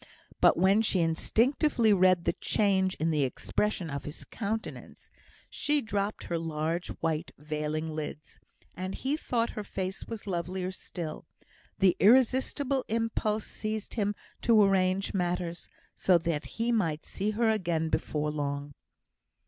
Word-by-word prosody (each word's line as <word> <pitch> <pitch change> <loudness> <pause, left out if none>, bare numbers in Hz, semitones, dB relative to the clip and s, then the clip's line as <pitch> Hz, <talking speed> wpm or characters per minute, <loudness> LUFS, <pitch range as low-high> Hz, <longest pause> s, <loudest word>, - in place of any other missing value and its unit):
But - - +5
when 190 +5 +4
she 205 -4 +2
instinctively 230 - +2
read 185 -2 +4
the - - +1
change 190 -3 +1
in 160 +2 0
the 150 -2 +1
expression 170 +6 -1
of 140 -1 -4
his 150 - -7
countenance, 220 0 -5 0.4
she 295 0 +1
dropped 205 -3 -2
her 170 -1 -2
large 165 +1 -2
white 165 0 -1
veiling 150 +1 -3
lids; 155 0 -6 0.4
and 185 +1 -4
he 270 +3 -1
thought 235 -6 -1
her 210 - -5
face 190 -1 -4
was 225 -2 -6
lovelier 180 0 -2
still. 170 -4 -6 0.5
The 190 -2 +4
irresistible 260 +4 +3
impulse 220 -1 0
seized 215 -1 -4
him 205 -2 0 0.3
to 225 -3 +5
arrange 195 0 +2
matters 175 -2 -2 0.2
so 185 -2 +4
that 165 -2 -2
he 230 +1 +1
might 165 -9 0
see 200 +2 -2
her 230 -1 +4
again 170 -6 0
before 150 -1 -1
long. 145 -1 -3
185 Hz, 140 wpm, -29 LUFS, 160-220 Hz, 0.5 s, But